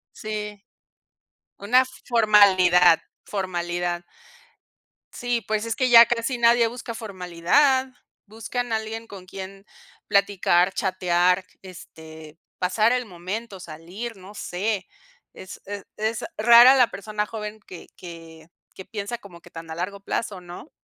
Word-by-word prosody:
Sí. 210 -1 -6 1.0
Una 250 +6 +3 0.2
formalidad, 190 -7 +5 0.2
formalidad. 175 -2 -3 1.1
Sí, 245 -1 -2
pues 215 -1 -1
es 230 -1 -2
que 255 - +1
ya 235 -1 +9
casi 240 +2 -2
nadie 235 0 +4
busca 235 0 -8
formalidad. 220 - +1 0.4
Buscan 230 +3 -5
a - - +2
alguien 220 +1 -6
con 195 -4 -12
quien 195 +1 -9 0.4
platicar, 195 -2 +2
chatear, 180 -1 +1 0.2
este, 160 -4 -13 0.2
pasar 215 +5 +2
el 250 -1 -1
momento, 195 +3 -7
salir, 180 +9 -8
no 190 +2 -13
sé. 195 0 -3 0.5
Es 190 - -11
es 200 0 -7
es 220 +1 -2
rara 235 +4 +8
la 250 -3 +4
persona 210 +1 -4
joven 215 0 -7
que 180 - -11
que 165 -2 -12 0.3
que 190 - -10
piensa 210 +3 -5
como 185 -6 -14
que 175 - -17
tan 165 -1 -10
a - - -5
largo 185 +4 -5
plazo, 200 -1 -4
¿no? 175 - -11
200 Hz, 130 wpm, -23 LUFS, 180-225 Hz, 1.1 s, ya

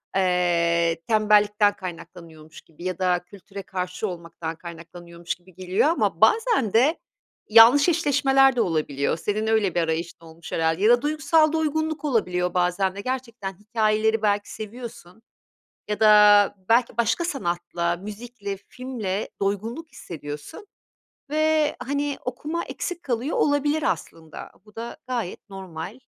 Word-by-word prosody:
eee, 170 -3 +2
tembellikten 210 -1 +3
kaynaklanıyormuş 165 -3 -10
gibi 165 +1 -16
ya 185 0 -3
da 180 -1 +2
kültüre 200 +1 -10
karşı 180 +2 -4
olmaktan 170 -2 -6
kaynaklanıyormuş 170 0 -8
gibi 180 +1 -21
geliyor 185 - 0
ama 335 - 0
bazen 445 - +3
de 275 +9 +3 0.5
yanlış 235 +8 +7
eşleşmeler 270 -5 +3
de 235 - +2
olabiliyor. 150 -3 -1
Senin 215 +5 -2
öyle 215 -5 +1
bir 175 - +2
arayışın 165 +1 -3
olmuş 165 +1 -12
herhâlde 165 +3 0
ya 215 - +5
da 240 0 +5
duygusal 310 +1 +2
doygunluk 315 0 -1
olabiliyor 180 -9 0
bazen 180 +1 0
de 200 - -5
gerçekten 235 -5 -4
hikayeleri 215 0 +1
belki 205 -1 0
seviyorsun 225 -3 -9 0.7
ya 210 0 -3
da 210 -2 +6
belki 235 0 +3
başka 235 +9 +1
sanatla, 175 - -2
müzikle, 205 +1 -7
filmle 215 -2 -5
doygunluk 225 - -3
hissediyorsun 150 - -9 0.6
ve, 310 0 +2
hani, 285 +1 -2
okuma 300 +7 -3
eksik 350 -1 -5
kalıyor 250 +2 -2
olabilir 290 +1 +1
aslında. 160 -9 -4
Bu 210 - -20
da 230 +1 -7
gayet 230 -5 -4
normal. 190 +3 -8
205 Hz, 130 wpm, -24 LUFS, 175-255 Hz, 0.7 s, yanlış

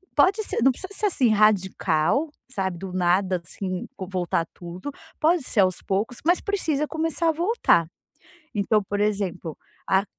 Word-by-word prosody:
Pode 385 +9 +4
ser, - - -2
não 265 - +6
precisa 375 +10 -8
ser 415 +1 +1
assim 260 - +2
radical, 205 - +2 0.2
sabe, 190 -8 -3
do 185 +1 -7
nada 185 0 +2
assim 185 +1 -4
vo 190 - -5
voltar 175 -3 -1
tudo, 180 +9 -7 0.3
pode 330 +2 +3
ser 240 -5 +1
aos 185 -1 +1
poucos, 205 +5 -2
mas 350 +3 +3
precisa 315 -8 -1
começar 325 +1 0
a - - +5
voltar. 335 - +2 0.7
Então, 210 +1 +2
por 205 +1 -3
exemplo, 195 -6 -1 0.3
a 190 +1 +3
205 Hz, 160 wpm, -24 LUFS, 185-310 Hz, 0.7 s, não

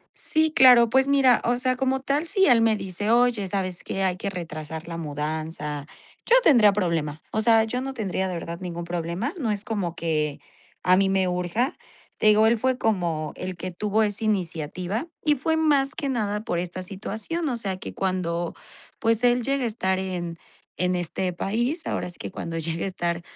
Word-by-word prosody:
Sí, 315 0 +1
claro. 250 -5 +8
Pues, 265 +2 +4
mira, 275 -3 +4
o 240 +1 +2
sea, 255 +1 0
como 265 +1 0
tal, 280 +4 -1
si 385 +3 +3
él 245 -4 +5
me 225 -1 +3
dice: 200 +2 -3
"Oye, 235 -3 +3
¿sabes 185 -2 -3
qué?, 195 - -3
hay 185 -2 +1
que 200 +2 -3
retrasar 160 -2 -6
la 165 - -5
mudanza", 150 -1 -4 0.4
yo 485 - +6
tendría 235 - +6
problema, 165 -6 -1
o 215 - 0
sea, 225 0 +5
yo 245 +3 -2
no 270 +1 -5
tendría, 190 -4 -2
de 185 - -3
verdad, 170 0 -5
ningún 175 -2 -5
problema, 175 - -3
no 245 -8 -1
es 205 0 -3
como 200 -8 -2
que 155 -4 -1 0.4
a 180 0 +5
mí 195 0 +3
me 190 -1 +2
urja. 180 - -1 0.4
Te - - +1
digo, 215 +1 +6
él 230 0 +2
fue 255 +2 0
como 170 - -1
el 185 0 -5
que 185 +2 -5
tuvo 210 +4 0
esa 210 +1 -1
iniciativa 180 - -1 0.2
y 300 -1 +3
fue 320 +5 0
más 295 -3 +2
que 290 -4 -3
nada 210 -5 -1
por 175 -7 -1
esta 180 +1 -4
situación, 215 - -3
o 250 - -1
sea, 195 -5 -2
que 185 - -8
cuando 175 -3 -2 0.4
pues 225 0 +2
él 245 0 +3
llega 275 +2 0
a - - +1
estar 190 -4 0
en 175 -3 -4 0.4
en 180 0 +2
este 180 +1 -2
país, 240 - -1
ahora - - -2
sí 175 - -10
que - - -5
cuando 165 -3 -5
llega 165 +1 -2
a - - -1
estar, 170 -2 -2
195 Hz, 200 wpm, -25 LUFS, 175-245 Hz, 0.4 s, claro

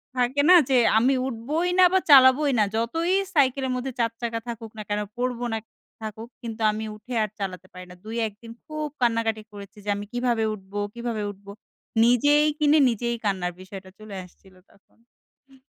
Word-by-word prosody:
থাকে 250 +3 +1
না 365 - +9
যে 260 - +4 0.2
আমি 255 +4 +3
উঠবই 290 +9 -2
না 365 - +9
বা 380 - +5
চালাবোই 275 +1 +7
না - - +5
যতই 330 +11 0 0.2
সাইকেলের 265 -2 +2
মধ্যে 255 +1 -3
৪ 230 -1 +1
চাকা 230 -1 -2
থাকুক 225 -2 -7
না - - -5
কেন 205 0 0 0.2
পড়ব 245 -1 -2
না 220 - -1 0.4
থাকুক 220 +2 -7
কিন্তু 225 -1 -7
আমি 220 +1 -4
উঠে 245 +4 -10
আর 210 - -3
চালাতে 185 -1 -5
পারি 180 0 -10
না। - - -12
২ 225 +1 -6
১ 210 - -10
দিন 230 0 -10
খুব 305 -1 -4
কান্নাকাটি 225 -2 +1
করেছি। 200 0 -11
যে - - -4
আমি 205 0 -6
কিভাবে 240 -2 0
উঠবো, 195 0 -7
কিভাবে 235 -3 -4
উঠবো? 200 0 -13 0.5
নিজেই 290 +5 +4
কিনে 300 +1 +4
নিজেই 235 +1 -2
কান্নার 185 -3 -1
বিষয়টা 190 0 -10
চলে 215 -2 -9
আসছিল 185 +1 -19 0.2
তখন। 240 +5 -29
230 Hz, 180 wpm, -24 LUFS, 210-260 Hz, 0.5 s, না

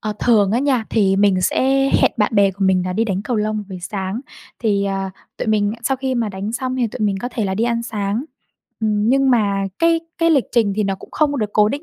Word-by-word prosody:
Ờ, 215 -1 -3
thường 210 -5 +4
á 235 - +2
nha, 260 -5 +1
thì 195 -3 +2
mình 195 -2 +3
sẽ 270 +7 +2
hẹn - - +5
bạn 215 0 +1
bè 200 -1 +4
của 195 +1 -3
mình 185 -1 +3
là 180 - -2
đi 225 +4 +1
đánh 195 -2 -2
cầu 235 +1 -2
lông 215 0 -1
buổi 185 -1 -7
sáng. 195 +4 -4 0.4
Thì, 200 -3 +1
à, 195 -1 -2 0.3
tụi - - -4
mình 210 -1 +2
sau 265 +3 0
khi 260 0 -2
mà 230 -3 0
đánh 200 +3 -5
xong 255 +1 -3
thì 245 -2 +1
tụi 220 - -8
mình 195 -1 0
có 245 - -3
thể 230 -4 -3
là 190 -1 -1
đi 225 +4 0
ăn 235 -1 0
sáng. 215 +2 -2 0.6
Ừm, 215 0 +1
nhưng 270 +1 +3
mà 200 -4 +2
cái 330 0 +3 0.2
cái 330 0 +3
lịch 280 -6 +3
trình 225 -5 +2
thì 215 - +1
nó 195 -1 0
cũng 190 - -14
không 290 -2 0
được 215 -2 -2
cố 210 0 +4
định 285 +5 -4
215 Hz, 260 wpm, -19 LUFS, 200-245 Hz, 0.6 s, hẹn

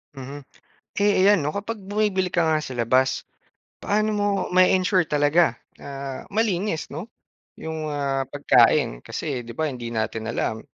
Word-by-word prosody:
Mhm. 135 +2 -7 0.6
Eh, 205 -2 +3
iyan 205 -1 +6
'no 145 - -1
kapag 210 +2 -4
bumibili 200 -1 0
ka 175 -2 +1
nga 155 -1 +2
sa 130 -4 -6
labas, 130 +3 +2 0.6
paano 215 +1 +1
mo 205 -1 0 0.3
ma-e-ensure 185 -1 +4
talaga 150 0 +3 0.2
na 135 -1 -6
malinis 200 -5 -1
'no 220 - -6 0.5
'yong 160 -1 -5
ah 140 -2 -1
pagkain? 135 - +3
Kasi 135 - -4
'di 115 - -8
ba 155 -2 0
hindi 120 -2 -6
natin 110 -1 -3
alam 110 -1 -2
155 Hz, 145 wpm, -24 LUFS, 135-190 Hz, 0.6 s, iyan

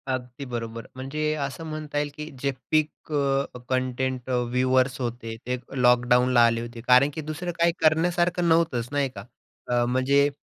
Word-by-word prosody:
अगदी 130 +1 -4
बरोबर. 115 -2 -5
म्हणजे 150 +4 -2
असं 140 +4 -7
म्हणता 155 -1 -5
येईल, 145 0 0
की 150 +1 -6
जे 140 - +1 0.2
पीक 155 0 0
अ, 140 -2 0
कंटेंट 130 0 -1
अ, - - 0 0.2
व्यूअर्स 130 +1 +2
होते, 120 -2 -4
ते 125 0 0 0.2
लॉकडाऊनला 125 0 +5
आले 115 0 +1
होते. 120 0 -8
कारण 125 +3 +6
की 160 - -4
दुसरं 155 +4 -4
काही 170 0 +4
करण्यासारखं 175 +2 +2
नव्हतंच 160 -8 +2
नाही 145 -2 +1
का? 100 - -8 0.4
अ, 120 -1 +2
म्हणजे 135 +3 +3
130 Hz, 160 wpm, -25 LUFS, 125-150 Hz, 0.4 s, कारण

